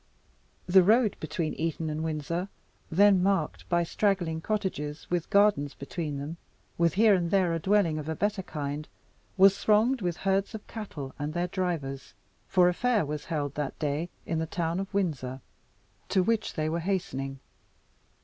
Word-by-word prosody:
The 185 Hz, +1 st, +6 dB
road 215 Hz, +3 st, +4 dB
between 155 Hz, +1 st, -2 dB
Eton 165 Hz, 0 st, -2 dB
and 155 Hz, +1 st, -3 dB
Windsor, 160 Hz, +4 st, -2 dB, 0.4 s
then 195 Hz, +2 st, +5 dB
marked 195 Hz, +1 st, 0 dB
by 175 Hz, -1 st, +3 dB
straggling 175 Hz, -3 st, 0 dB
cottages 160 Hz, -8 st, -3 dB
with 175 Hz, -2 st, -1 dB
gardens 200 Hz, -9 st, +3 dB
between 150 Hz, 0 st, -4 dB
them, 145 Hz, +4 st, -5 dB, 0.4 s
with 170 Hz, -1 st, +2 dB
here 215 Hz, +1 st, +6 dB
and 175 Hz, -3 st, +1 dB
there 185 Hz, -3 st, +2 dB
a 165 Hz, -, -1 dB
dwelling 180 Hz, -3 st, +2 dB
of 150 Hz, +1 st, -6 dB
a 160 Hz, -, -1 dB
better 205 Hz, +1 st, 0 dB
kind, 150 Hz, -3 st, -5 dB, 0.5 s
was 195 Hz, +1 st, +6 dB
thronged 225 Hz, +4 st, +3 dB
with 175 Hz, -2 st, -1 dB
herds 195 Hz, +3 st, 0 dB
of 215 Hz, -, -8 dB
cattle 180 Hz, -12 st, -7 dB
and 150 Hz, +2 st, -3 dB
their 175 Hz, +1 st, 0 dB
drivers, 165 Hz, -8 st, -3 dB, 0.3 s
for 180 Hz, -2 st, +4 dB
a 180 Hz, -, +3 dB
fair 235 Hz, -3 st, +1 dB
was 150 Hz, 0 st, -5 dB
held 145 Hz, -4 st, -2 dB
that 145 Hz, -1 st, -3 dB
day 150 Hz, +3 st, -2 dB, 0.2 s
in 165 Hz, -, -1 dB
the 160 Hz, -, -2 dB
town 170 Hz, +1 st, -1 dB
of 195 Hz, 0 st, -4 dB
Windsor, 145 Hz, -10 st, -2 dB, 0.7 s
to 190 Hz, -, +3 dB
which 225 Hz, +2 st, 0 dB
they 155 Hz, 0 st, 0 dB
were 165 Hz, +2 st, -1 dB
hastening. 135 Hz, -7 st, -2 dB
170 Hz, 170 wpm, -28 LUFS, 155-195 Hz, 0.7 s, The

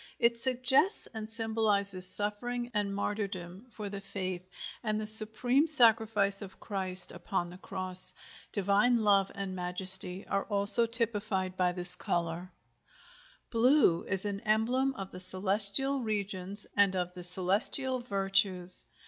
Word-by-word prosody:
It 235 Hz, 0 st, -1 dB
suggests 265 Hz, -, 0 dB
and 220 Hz, -1 st, -8 dB
symbolizes 210 Hz, -4 st, 0 dB
suffering 240 Hz, +5 st, -2 dB
and 205 Hz, -1 st, -4 dB
martyrdom 200 Hz, 0 st, -7 dB
for 215 Hz, -3 st, -10 dB
the 200 Hz, 0 st, -9 dB
faith, 185 Hz, -2 st, -8 dB, 0.3 s
and 215 Hz, -2 st, -4 dB
the 215 Hz, -, -7 dB
supreme 220 Hz, +7 st, +4 dB
sacrifice 220 Hz, -7 st, 0 dB
of 190 Hz, -2 st, -13 dB
Christ 190 Hz, -3 st, 0 dB
upon 175 Hz, 0 st, -6 dB
the 180 Hz, -, -15 dB
Cross. 185 Hz, -1 st, -2 dB, 0.4 s
Divine 210 Hz, +4 st, -1 dB
love 200 Hz, -2 st, 0 dB
and 195 Hz, -2 st, -8 dB
majesty 185 Hz, +1 st, +5 dB
are 200 Hz, 0 st, -4 dB
also 205 Hz, +3 st, +8 dB
typified 210 Hz, -5 st, +2 dB
by 180 Hz, -1 st, -2 dB
this 180 Hz, 0 st, +1 dB
color. 175 Hz, +1 st, -6 dB, 1.0 s
BLUE 235 Hz, -, 0 dB
is 190 Hz, +1 st, -5 dB
an 200 Hz, -1 st, -6 dB
emblem 240 Hz, +5 st, -2 dB
of 195 Hz, -4 st, -10 dB
the 180 Hz, -, -12 dB
celestial 200 Hz, +8 st, -3 dB
regions 200 Hz, -3 st, -6 dB
and 200 Hz, -2 st, 0 dB
of 180 Hz, -1 st, -5 dB
the 180 Hz, -1 st, -12 dB
celestial 200 Hz, +9 st, +2 dB
virtues. 195 Hz, -4 st, -1 dB
200 Hz, 130 wpm, -27 LUFS, 185-225 Hz, 1.0 s, also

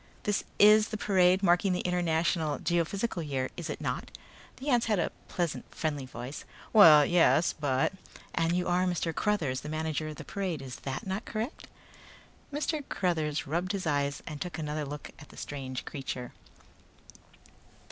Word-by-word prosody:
"This 205 Hz, -1 st, 0 dB
is 210 Hz, +1 st, +7 dB
the 215 Hz, -, -4 dB
parade 190 Hz, -2 st, +3 dB
marking 180 Hz, +1 st, +4 dB
the 180 Hz, -, 0 dB
International 170 Hz, -3 st, +1 dB
Geophysical 175 Hz, +4 st, -1 dB
Year, 135 Hz, -4 st, -2 dB
is 170 Hz, -2 st, -5 dB
it -, -, -4 dB
not?" -, -, -3 dB, 0.5 s
The 275 Hz, +3 st, -4 dB
ant 245 Hz, -3 st, +3 dB
had 215 Hz, -2 st, +2 dB
a 170 Hz, -, 0 dB, 0.2 s
pleasant, 175 Hz, -4 st, -2 dB
friendly 145 Hz, -4 st, -2 dB
voice. 125 Hz, +2 st, -7 dB, 0.3 s
"Well, 155 Hz, -9 st, +9 dB
yes, 175 Hz, 0 st, +4 dB
but 140 Hz, +2 st, 0 dB, 0.2 s
" -, -, -16 dB
"And 165 Hz, 0 st, +1 dB
you 180 Hz, 0 st, 0 dB
are 180 Hz, +1 st, +2 dB
Mr. 170 Hz, -2 st, -1 dB
Cruthers, 155 Hz, -11 st, 0 dB
the 150 Hz, -, -7 dB
manager 155 Hz, 0 st, -2 dB
of 155 Hz, -, -6 dB
the -, -, -9 dB
parade, 185 Hz, -6 st, -3 dB
is 130 Hz, -2 st, -7 dB
that 135 Hz, -1 st, -5 dB
not 195 Hz, +3 st, -3 dB
correct?" 230 Hz, +6 st, -4 dB, 0.8 s
Mr. 300 Hz, +1 st, -1 dB
Cruthers 160 Hz, -5 st, 0 dB
rubbed 175 Hz, +6 st, -1 dB
his 195 Hz, -2 st, -3 dB
eyes 145 Hz, -2 st, 0 dB
and 150 Hz, -2 st, -7 dB
took 180 Hz, -1 st, -4 dB
another 150 Hz, -1 st, -3 dB
look 145 Hz, +1 st, -7 dB
at 150 Hz, -, -13 dB
the -, -, -15 dB
strange 130 Hz, -3 st, -5 dB
creature. 130 Hz, -3 st, -5 dB
165 Hz, 165 wpm, -30 LUFS, 150-190 Hz, 0.8 s, Well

